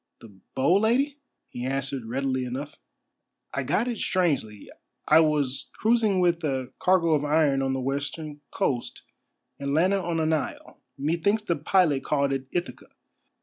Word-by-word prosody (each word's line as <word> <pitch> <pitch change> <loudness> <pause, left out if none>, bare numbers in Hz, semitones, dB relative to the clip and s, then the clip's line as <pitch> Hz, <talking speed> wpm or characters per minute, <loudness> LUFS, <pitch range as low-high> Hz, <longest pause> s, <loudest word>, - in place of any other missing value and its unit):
"The 110 -4 -14 0.2
bow, 140 +8 +4
Lady?" 265 +7 +1 0.3
he 120 - -7
answered 135 -1 -2
readily 130 +1 -1
enough. 130 +4 -5 0.8
"I - - -1
got 240 - 0
it 240 -3 -3
strangely. 140 - -1 0.4
I 155 - +7
was 150 -4 +1
cruising 220 -4 +2
with 175 -2 +2
a 130 -4 -2
cargo 180 -3 +3
of 150 -2 +2
iron 145 -2 +2
on 135 0 0
the 135 - -1
western 145 +3 -4
coast 120 -3 -2 0.6
and 140 0 -2
landed 190 +5 +3
on 170 -2 -2
an 160 0 +1
isle, 155 - -4 0.2
methinks 170 +9 0
the 170 -5 0
pilot 155 -2 +2
called 140 -2 +1
it 135 -1 -3
Ithaca. 175 +4 -4
150 Hz, 150 wpm, -26 LUFS, 135-180 Hz, 0.8 s, I